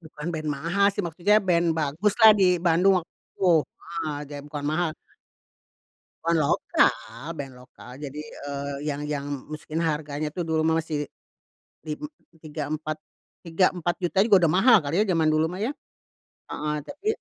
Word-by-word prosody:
Bukan 155 Hz, -2 st, -10 dB
band 155 Hz, -1 st, -4 dB
mahal 170 Hz, +8 st, +1 dB
sih 205 Hz, -, -1 dB
maksudnya 175 Hz, +5 st, +2 dB
band 175 Hz, -2 st, +2 dB
baguslah 195 Hz, +9 st, +4 dB
di 180 Hz, -1 st, +5 dB
Bandung 180 Hz, +3 st, +4 dB
waktu 165 Hz, -, -10 dB, 0.2 s
itu. 190 Hz, -, -1 dB, 0.3 s
Heeh, 165 Hz, -3 st, -5 dB
jadi 145 Hz, -1 st, -7 dB
bukan 145 Hz, -1 st, -5 dB
mahal. 155 Hz, +2 st, 0 dB, 1.3 s
Band 165 Hz, -1 st, +2 dB
lokal 140 Hz, -1 st, +1 dB
band 135 Hz, -2 st, -6 dB
lokal, 125 Hz, 0 st, -14 dB
jadi, 145 Hz, -1 st, -7 dB, 0.3 s
eee, 140 Hz, 0 st, -4 dB
yang 145 Hz, 0 st, -3 dB
yang 150 Hz, -1 st, -3 dB, 0.2 s
masukin 155 Hz, 0 st, -7 dB
harganya 150 Hz, -1 st, -2 dB
tuh 175 Hz, -, -5 dB
dulu 160 Hz, -1 st, 0 dB
mah 160 Hz, 0 st, +3 dB
masih 150 Hz, -2 st, -3 dB, 0.8 s
lim 150 Hz, -, -5 dB, 0.4 s
tiga 150 Hz, -1 st, -5 dB
empat 155 Hz, 0 st, -4 dB, 0.5 s
tiga 170 Hz, +3 st, +3 dB
empat 175 Hz, -1 st, -2 dB
juta 175 Hz, +2 st, +1 dB
juga 195 Hz, -5 st, +5 dB
udah 160 Hz, -, +4 dB
mahal 225 Hz, +7 st, +6 dB
kali 155 Hz, +7 st, 0 dB
ya 215 Hz, -, +4 dB
zaman 165 Hz, -4 st, +2 dB
dulu 155 Hz, +1 st, +2 dB
mah 180 Hz, +5 st, -4 dB
ya? 250 Hz, -, 0 dB, 0.8 s
Heeh 150 Hz, 0 st, -2 dB
tapi 290 Hz, -, -9 dB
160 Hz, 160 wpm, -25 LUFS, 150-175 Hz, 1.3 s, mahal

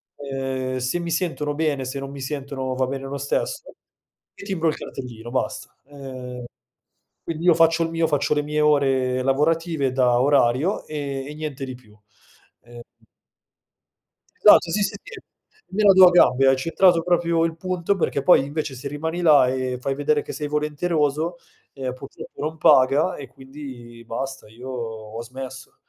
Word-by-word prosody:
ehm, 135 Hz, -2 st, -4 dB
se 130 Hz, +7 st, -1 dB
mi 170 Hz, -1 st, -4 dB
sentono 160 Hz, -3 st, -1 dB
bene, 145 Hz, -4 st, -1 dB
se 130 Hz, +2 st, -4 dB
non 135 Hz, 0 st, -6 dB
mi 140 Hz, -, -9 dB
sentono 135 Hz, -2 st, -4 dB
va 130 Hz, 0 st, 0 dB
bene 135 Hz, +1 st, -5 dB
lo 140 Hz, +1 st, -5 dB
stesso, 140 Hz, -, -2 dB, 0.7 s
e -, -, -11 dB
timbro 190 Hz, -5 st, -1 dB
il 155 Hz, -, -2 dB
cartellino, 120 Hz, -3 st, -8 dB
basta. 130 Hz, -, -3 dB
Ehm, 130 Hz, -3 st, -8 dB, 0.8 s
quindi 165 Hz, 0 st, -5 dB
io 175 Hz, -, +7 dB
faccio 165 Hz, 0 st, +4 dB
il 165 Hz, -, -2 dB
mio, 165 Hz, 0 st, +1 dB
faccio 145 Hz, -1 st, +1 dB
le 150 Hz, -, +1 dB
mie 150 Hz, +1 st, -2 dB
ore 135 Hz, -4 st, +2 dB
lavorative 150 Hz, +1 st, +1 dB
da 125 Hz, -2 st, +3 dB
orario, 140 Hz, -, +2 dB
e 140 Hz, -3 st, -4 dB
e 150 Hz, -, -8 dB
niente 150 Hz, -3 st, -5 dB
di 130 Hz, -, -7 dB
più. 110 Hz, -4 st, -20 dB, 0.6 s
Ehm 120 Hz, 0 st, -13 dB, 1.6 s
Esatto, -, -, +6 dB
si, 210 Hz, -, 0 dB
si, 200 Hz, -, -1 dB
sì, -, -, -10 dB, 0.5 s
me 210 Hz, +3 st, 0 dB
la 200 Hz, -, +7 dB
do 185 Hz, -1 st, +9 dB
a -, -, +5 dB
gambe, 135 Hz, -6 st, +5 dB
hai 135 Hz, -, +5 dB
centrato 165 Hz, +5 st, +3 dB
proprio 170 Hz, -1 st, +2 dB
il 165 Hz, -1 st, -3 dB
punto, 185 Hz, +2 st, -1 dB
perché 165 Hz, -6 st, -1 dB
poi 160 Hz, -4 st, +5 dB
invece, 145 Hz, -1 st, -4 dB
se 130 Hz, +3 st, -7 dB
rimani 160 Hz, +5 st, -4 dB
là 150 Hz, -6 st, +6 dB
e 130 Hz, -1 st, -2 dB
fai 135 Hz, +2 st, -2 dB
vedere 145 Hz, +1 st, +1 dB
che -, -, -8 dB
sei 150 Hz, -1 st, -4 dB
volenteroso, 150 Hz, +2 st, -1 dB, 0.4 s
ehm, 130 Hz, -2 st, -4 dB
purtroppo 130 Hz, +1 st, -11 dB
non 155 Hz, +2 st, -3 dB
paga 140 Hz, +4 st, +4 dB
e 140 Hz, -, -8 dB
quindi 130 Hz, -3 st, -11 dB
basta, 135 Hz, +2 st, -5 dB
io 120 Hz, +4 st, -11 dB
ho 115 Hz, -3 st, -6 dB
smesso. 130 Hz, +2 st, -9 dB
140 Hz, 170 wpm, -23 LUFS, 130-160 Hz, 1.6 s, do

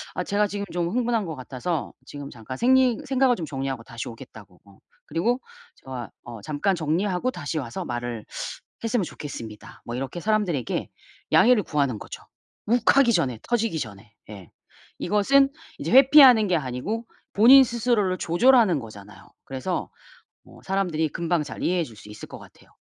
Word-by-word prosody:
"아 180 Hz, -, -1 dB
제가 205 Hz, +2 st, +1 dB
지금 200 Hz, 0 st, -4 dB
좀 175 Hz, -1 st, -1 dB
흥분한 235 Hz, -1 st, 0 dB
거 160 Hz, -3 st, -5 dB
같아서 135 Hz, +5 st, -4 dB
지금 145 Hz, 0 st, -8 dB
잠깐 125 Hz, +3 st, -8 dB
생리 255 Hz, -1 st, +4 dB
생각을 260 Hz, -2 st, +2 dB
좀 165 Hz, -, -4 dB
정리하고 135 Hz, -4 st, -4 dB
다시 115 Hz, 0 st, -7 dB
오겠다."고. 105 Hz, -5 st, -13 dB
어 100 Hz, -1 st, -20 dB, 0.3 s
그리고 225 Hz, -, 0 dB, 0.4 s
"제가 125 Hz, -3 st, -8 dB
어 115 Hz, -3 st, -9 dB
잠깐 155 Hz, -, 0 dB
정리하고 180 Hz, +7 st, -1 dB
다시 155 Hz, -, -4 dB
와서 120 Hz, -4 st, -5 dB
말을 120 Hz, -2 st, -5 dB, 0.6 s
했으면 230 Hz, -3 st, 0 dB
좋겠습니다." 115 Hz, -10 st, -9 dB
뭐 120 Hz, -, -5 dB
이렇게 135 Hz, +7 st, -4 dB
사람들에게 200 Hz, -, -1 dB, 0.4 s
양해를 245 Hz, -2 st, +6 dB
구하는 140 Hz, -9 st, -1 dB
거죠. -, -, -10 dB, 0.4 s
욱하기 240 Hz, +1 st, +4 dB
전에 125 Hz, -, 0 dB
터지기 230 Hz, -8 st, -1 dB
전에. 105 Hz, -4 st, -8 dB, 0.2 s
예. 95 Hz, -4 st, -11 dB, 0.5 s
이것은 270 Hz, +7 st, +3 dB, 0.3 s
이제 -, -, -4 dB
회피하는 260 Hz, -4 st, +8 dB
게 180 Hz, -2 st, +2 dB
아니고 150 Hz, -, -4 dB, 0.3 s
본인 260 Hz, +6 st, +8 dB
스스로를 230 Hz, -6 st, 0 dB
조절하는 200 Hz, -, +4 dB
거잖아요. 105 Hz, -4 st, -12 dB, 0.2 s
그래서 135 Hz, +7 st, -4 dB, 0.6 s
어 -, -, -16 dB
사람들이 180 Hz, -5 st, 0 dB
금방 170 Hz, 0 st, -1 dB
잘 -, -, -8 dB
이해해 180 Hz, 0 st, +1 dB
줄 115 Hz, -7 st, -13 dB
수 105 Hz, 0 st, -14 dB
있을 105 Hz, -, -10 dB
것 -, -, -9 dB
같아요. -, -, -18 dB
170 Hz, 360 characters per minute, -24 LUFS, -, 0.6 s, 회피하는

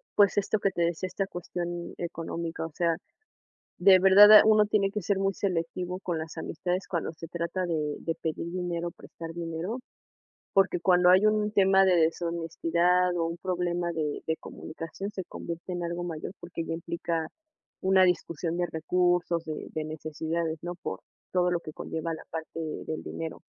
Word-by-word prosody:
pues, 205 Hz, -1 st, +5 dB
esto 205 Hz, +1 st, +1 dB
que 195 Hz, -, +2 dB
te 175 Hz, -2 st, 0 dB
decía, 170 Hz, +2 st, -1 dB
esta 190 Hz, +1 st, -2 dB
cuestión 175 Hz, -1 st, -5 dB
económica. 165 Hz, -1 st, -4 dB
O 165 Hz, -, -7 dB
sea, 165 Hz, +1 st, +1 dB, 0.8 s
de 190 Hz, +1 st, +8 dB
verdad, 205 Hz, +3 st, +9 dB
uno 215 Hz, -1 st, +6 dB
tiene 200 Hz, -2 st, +2 dB
que 210 Hz, -, -3 dB
ser 195 Hz, +2 st, 0 dB
muy 195 Hz, 0 st, +1 dB
selectivo 180 Hz, -1 st, -2 dB
con 175 Hz, -4 st, -2 dB
las 160 Hz, 0 st, -7 dB
amistades 180 Hz, +3 st, -3 dB
cuando 170 Hz, -4 st, -2 dB
se 165 Hz, +1 st, -9 dB
trata 170 Hz, +2 st, -2 dB
de 155 Hz, -4 st, -1 dB
de 165 Hz, -, -2 dB
pedir 165 Hz, +1 st, -4 dB
dinero, 175 Hz, -1 st, -2 dB
prestar 165 Hz, 0 st, -10 dB
dinero, 170 Hz, +7 st, -4 dB, 0.7 s
porque 195 Hz, -2 st, +3 dB
cuando 180 Hz, +1 st, +5 dB
hay 185 Hz, +3 st, +6 dB
un 215 Hz, 0 st, +3 dB
tema 195 Hz, -2 st, +5 dB
de 185 Hz, -1 st, +4 dB
deshonestidad, 170 Hz, +2 st, +1 dB
o 165 Hz, -, +1 dB
un 165 Hz, +1 st, -3 dB
problema 175 Hz, -1 st, -1 dB
de 155 Hz, -3 st, -2 dB
de 160 Hz, 0 st, 0 dB
comunicación, 165 Hz, +5 st, -7 dB
se 190 Hz, -2 st, -5 dB
convierte 170 Hz, +1 st, -7 dB
en 175 Hz, 0 st, -3 dB
algo 170 Hz, +1 st, -3 dB
mayor, 165 Hz, -2 st, -5 dB
porque 175 Hz, -1 st, -5 dB
ya 165 Hz, -, -4 dB
implica 170 Hz, -1 st, -3 dB, 0.5 s
una 190 Hz, 0 st, +5 dB
discusión 170 Hz, -2 st, 0 dB
de 175 Hz, 0 st, 0 dB
recursos, 175 Hz, +1 st, +1 dB
de 155 Hz, -1 st, -5 dB
de 155 Hz, -, -2 dB
necesidades, 160 Hz, +1 st, -3 dB
¿no? 175 Hz, 0 st, -4 dB
Por 180 Hz, -, -5 dB, 0.3 s
todo 180 Hz, -1 st, +2 dB
lo 175 Hz, -, +1 dB
que 155 Hz, -2 st, -9 dB
conlleva 160 Hz, +2 st, -4 dB
la 160 Hz, -, -8 dB
parte 160 Hz, 0 st, -5 dB, 0.3 s
del 155 Hz, -, -4 dB
dinero. 160 Hz, -1 st, -6 dB
175 Hz, 175 wpm, -28 LUFS, 165-185 Hz, 0.8 s, verdad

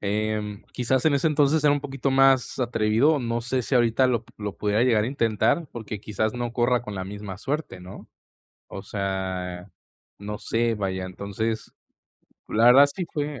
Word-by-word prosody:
em, 105 Hz, 0 st, -2 dB
quizás 125 Hz, +1 st, 0 dB
en 145 Hz, -, +4 dB
ese 140 Hz, +4 st, +1 dB
entonces 150 Hz, 0 st, +2 dB
era 145 Hz, -, +6 dB
un 145 Hz, -, 0 dB
poquito 135 Hz, -1 st, -2 dB
más 135 Hz, -1 st, +3 dB
atrevido, 120 Hz, +5 st, +2 dB
no 120 Hz, -2 st, -2 dB
sé 125 Hz, +1 st, -1 dB
si 130 Hz, -, -2 dB
ahorita 120 Hz, +2 st, +3 dB
lo 120 Hz, -3 st, 0 dB
p -, -, -21 dB
lo 105 Hz, -2 st, -5 dB
pudiera 105 Hz, +2 st, +1 dB
llegar 115 Hz, -4 st, +3 dB
a -, -, -1 dB
intentar 130 Hz, -, +1 dB
porque 110 Hz, -3 st, -6 dB
quizás 110 Hz, +2 st, -2 dB
no 120 Hz, -1 st, -3 dB
corra 120 Hz, 0 st, +1 dB
con 105 Hz, -4 st, -7 dB
la 95 Hz, -, -4 dB
misma 100 Hz, 0 st, -7 dB
suerte, 135 Hz, -, -4 dB
¿no?, 90 Hz, +2 st, -11 dB, 0.6 s
o -, -, -7 dB
sea, 95 Hz, -2 st, -4 dB, 0.5 s
no 105 Hz, +1 st, -6 dB
sé, 115 Hz, 0 st, 0 dB
vaya. 95 Hz, -2 st, -3 dB
Entonces 100 Hz, +4 st, -4 dB, 0.8 s
la 115 Hz, +2 st, +3 dB
verdad, 135 Hz, +4 st, +8 dB
sí 180 Hz, -3 st, -4 dB
fue 145 Hz, -4 st, -4 dB
115 Hz, 180 wpm, -25 LUFS, 105-130 Hz, 0.8 s, verdad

